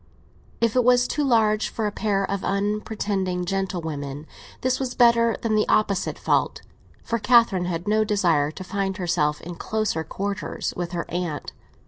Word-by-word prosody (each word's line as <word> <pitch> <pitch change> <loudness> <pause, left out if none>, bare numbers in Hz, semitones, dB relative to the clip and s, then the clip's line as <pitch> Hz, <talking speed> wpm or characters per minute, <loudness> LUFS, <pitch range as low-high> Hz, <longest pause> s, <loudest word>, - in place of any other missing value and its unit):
If 230 -1 +1
it 250 - +4
was 250 +1 +4
too 295 - -1
large 220 -5 +2
for 220 - -3
a 210 - 0
pair 200 -2 0
of 200 0 -3
unpretending 200 -2 -1
gentlewomen, 160 -7 -3 0.4
this 255 0 +1
was 255 -2 -3
better 235 -1 +4
than 225 -2 0
the 215 0 +2
opposite 200 -3 +1
fault; - - 0 0.4
for 230 - -1
Catherine 230 -6 +4
had 175 +1 -3
no 215 +1 +3
desire 175 -9 +2
to 170 +5 -8
find 195 0 -2
herself 150 -5 0
in 175 - -7
closer 210 -3 -2
quarters 200 +5 -4
with 175 0 -4
her 170 - -2
aunt. 175 -4 -3
200 Hz, 160 wpm, -24 LUFS, 175-220 Hz, 0.4 s, it